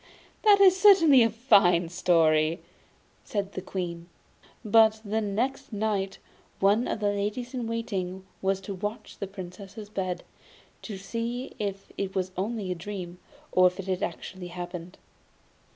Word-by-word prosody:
'That 415 -2 +6
is 380 -2 +7
certainly 330 -10 +7
a 230 - +5
fine 200 -7 +4
story,' 165 -2 +3 0.6
said 200 -2 -3
the 185 - -4
Queen. 175 -2 -5 0.6
But 220 0 +5
the 215 +2 0
next 250 +7 -2
night 205 -2 -1 0.4
one 205 +5 +3
of - - -2
the 205 -1 +2
ladies 210 +5 -3
in 245 -3 -3
waiting 190 -5 -3 0.2
was 195 0 +1
to 195 +1 -6
watch 205 +3 -5
at - - -22
the 200 - -3
Princess's 195 +2 -9
bed, 185 -4 -3 0.6
to 210 -4 -6
see 230 +6 -4
if 200 -2 -4
it 195 -1 -3
was 185 -1 -1
only 200 0 -2
a - - +1
dream, 180 0 -7 0.3
or 185 0 +6
if 180 +2 -3
it 195 - -4
had 185 -2 -2
actually 180 +2 -5
happened. 175 0 -7
195 Hz, 150 wpm, -27 LUFS, 185-220 Hz, 0.6 s, is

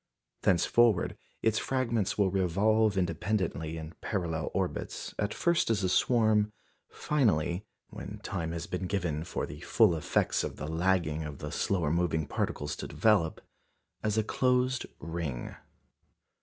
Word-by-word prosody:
Thenceforward 105 +3 +3 0.3
its 110 -1 +3
fragments 115 -6 0
will 100 -3 +3
revolve 100 +3 +2
independently 85 -3 -1
in 80 0 -7
parallel 85 -6 -2
orbits, - - -3
at 105 0 0
first 170 -6 +1
as 105 -4 +1
a 95 - +2
swarm, 110 -1 +3 0.4
finally 100 - 0 0.2
when - - -7
time 80 -1 -3
has 85 -1 -4
been 90 0 -3
given 85 -6 -1
for - - -3
the 75 +1 -9
full 105 +3 +4
effects 80 - +1
of - - -4
the - - -6
lagging 80 -1 +1
of 75 -2 -6
the - - -6
slower 85 -7 0
moving 85 -2 +1
particles 75 +1 -2
to - - -5
develop 100 -8 +2 0.6
as 105 0 0
a 110 - +3
closed 125 +2 +1
ring. 80 -5 -4
95 Hz, 140 wpm, -30 LUFS, 80-110 Hz, 0.6 s, full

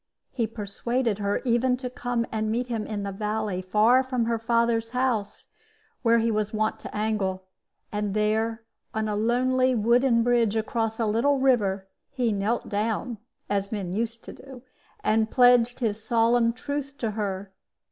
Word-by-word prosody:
He 230 -3 -1
persuaded 225 +1 -2
her 200 0 -1
even 250 +1 +2
to 255 0 -5
come 245 -1 -2
and 215 -1 -1
meet 240 +3 0
him 230 -3 -3
in 205 -2 -4
the 200 - -3
valley 210 -1 -2
far 215 +7 +4
from 255 -3 -1
her 230 0 0
father's 230 0 +1
house, 235 -6 -1 0.5
where 235 -2 +4
he 230 0 +1
was 215 -1 -1
wont 215 0 0
to - - -7
angle; 205 -3 -1 0.5
and 210 -1 -2
there, 220 +2 0 0.3
on 220 0 0
a 210 - -1
lonely 255 +4 +2
wooden 235 +2 +3
bridge 235 -3 +2
across 225 0 -1
a 230 - +1
little 235 +7 +2
river, 210 -8 +2 0.2
he 245 -4 0
knelt 205 +4 -1
down 220 +2 -2 0.3
(as 200 0 -1
men 195 -5 -3
used 230 +2 -3
to - - -9
do) 260 -2 -12 0.4
and 220 +1 +2
pledged 245 0 +4
his 215 -2 -1
solemn 230 0 +3
truth 280 +2 -5
to 225 -5 -2
her. 200 -2 -4
225 Hz, 165 wpm, -26 LUFS, 210-245 Hz, 0.5 s, far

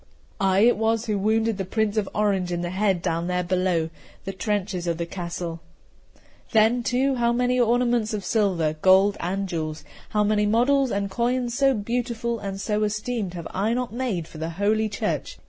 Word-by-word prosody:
I 195 0 +3
it 240 +2 +5
was 225 +1 +1
who 210 -3 -1
wounded 220 +1 +1
the - - 0
Prince 215 +2 -1
of 210 -3 0
Orange 195 -4 +1
in 175 0 -1
the 175 0 -3
head 190 -2 +1
down 170 -1 -1
there 180 0 0
below 180 -2 0 0.3
the 195 - -4
trenches 190 -2 -2
of 170 -1 0
the 170 - -2
castle. 170 -1 -5 0.9
Then, 225 +3 +4
too, 255 +3 +1
how 235 0 +2
many 250 +1 +1
ornaments 240 -1 +2
of 210 -3 -4
silver, 185 -8 +1
gold, 190 +2 +5
and 195 +3 -2
jewels, 155 -3 -4 0.3
how 210 -1 +1
many 210 0 +2
models 260 +5 +3
and 200 -2 -2
coins, 240 +2 0
so 270 0 +3
beautiful 235 +1 -2
and 195 -1 -5
so 210 +1 0
esteemed, 210 -2 -2
have 170 -2 -6
I 210 +5 0
not 250 -3 -3
made 230 -10 -2
for 160 0 -8
Holy 210 +5 0
Church! 205 - -3
210 Hz, 180 wpm, -24 LUFS, 185-230 Hz, 0.9 s, it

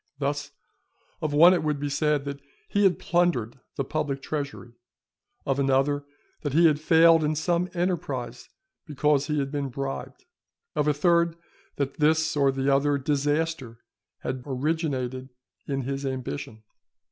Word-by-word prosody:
Thus, 145 +1 -2 0.7
of 155 - -1
one 165 +5 +7
it 180 - +1
would 150 -2 -1
be 145 - -2
said 145 0 0
that 140 0 -5 0.3
he 205 0 +2
had 190 - +4
plundered 155 -9 0 0.2
the 140 - -1
public 145 -1 -2
treasury, 140 -5 -5 0.7
of 135 0 0
another, 140 +1 +1 0.4
that 145 -3 -3
he 165 +3 +5
had 150 -2 +4
failed 165 0 +6
in 155 +1 0
some 170 +3 0
enterprise 140 -9 -3 0.4
because 150 -1 +1
he 150 -1 -1
had 135 -1 -1
been 145 -2 -2
bribed; 135 - -6 0.5
of 150 - +1
a 150 - +4
third, 170 +2 +3 0.4
that 140 +1 -3
this 155 +1 +2
or 140 -2 +3
the 135 0 -2
other 140 +1 +2
disaster 145 -2 -1 0.4
had 130 - -3
originated 130 -2 -2 0.4
in 135 -2 -2
his 135 +2 -3
ambition. 120 - -5
145 Hz, 145 wpm, -26 LUFS, 135-155 Hz, 0.7 s, one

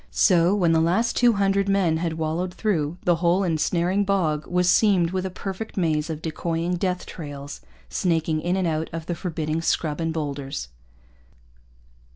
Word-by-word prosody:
So, 180 0 +4
when 175 -5 +2
the 160 -1 +3
last 195 +9 +1
two 245 -1 +4
hundred 200 -1 +1
men 185 -5 +2
had 165 0 -2
wallowed 165 +3 -2
through, 170 -7 -1
the 175 -2 +3
whole 175 +3 +2
ensnaring 175 +3 +1
bog 165 -7 0
was 180 0 +1
seamed 180 -3 +4
with 190 0 -1
a - - -5
perfect 195 +4 -6
maze 160 -3 0
of 160 -1 -5
decoying 170 +2 -2
death 180 0 -2
trails 145 -3 -8 0.3
snaking 160 - 0
in 175 +3 0
and 190 -2 0
out 160 0 -1
of 165 -1 -5
the 175 - -2
forbidding 160 -2 -3
scrub 160 -1 -1
and 165 0 0
boulders. 140 - -4
170 Hz, 170 wpm, -24 LUFS, 160-185 Hz, 0.3 s, So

